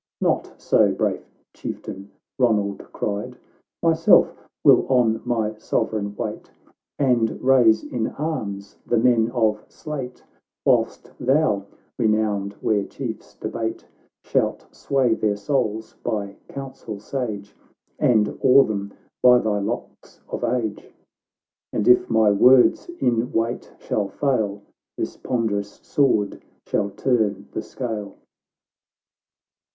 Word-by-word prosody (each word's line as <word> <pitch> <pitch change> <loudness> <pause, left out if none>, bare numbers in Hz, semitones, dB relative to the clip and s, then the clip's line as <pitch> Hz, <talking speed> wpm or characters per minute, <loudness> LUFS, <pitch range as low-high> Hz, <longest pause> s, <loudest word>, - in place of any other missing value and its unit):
— - - -68
"Not - - -2
so, - - +3
brave - - -1 0.3
Chieftain," 100 +1 -7 0.3
Eonald 105 -5 +1
cried; 105 +5 -4 0.2
" - - -59
Myself 165 0 +5 0.3
will - - +6
on 115 -4 +3
my 110 -3 0
Sovereign 100 -2 -1
wait, - - -5 0.5
And 120 -5 +1
raise 120 -4 +4
in 115 -2 -2
arms 100 -11 -5
the 120 - 0
men 115 -1 +3
of 110 -3 0
Sleate, 135 -5 -7 0.4
Whilst - - +1
thou, 125 -8 +2 0.3
renowned 105 -3 +1
where 105 -2 +1
chiefs - - -7
debate, 110 0 -4 0.4
Shalt - - 0
sway 130 -4 +1
their 105 -2 0
souls 110 0 -2
by 100 -2 -3
counsel 130 -6 -7
sage, 105 -3 -5 0.4
And 110 -3 +2
awe 135 +1 +7
them 100 -3 -4 0.3
by 125 -1 +7
thy 110 -3 0
locks 100 - -6
of - - -4
age." 115 -3 -2 0.3
— - - -67
" - - -70
And 105 - 0
if 125 - +5
my 110 -2 +4
words 125 - +5
in 120 0 +1
weight 115 +2 -2
shall 105 -2 -2
fail, 105 -7 -1 0.3
This - - -3
ponderous 105 -5 -2
sword 115 -8 +1 0.2
shall 100 -1 0
turn 105 -4 0
the - - -3
scale." 110 -5 -5
110 Hz, 120 wpm, -23 LUFS, 105-125 Hz, 0.5 s, awe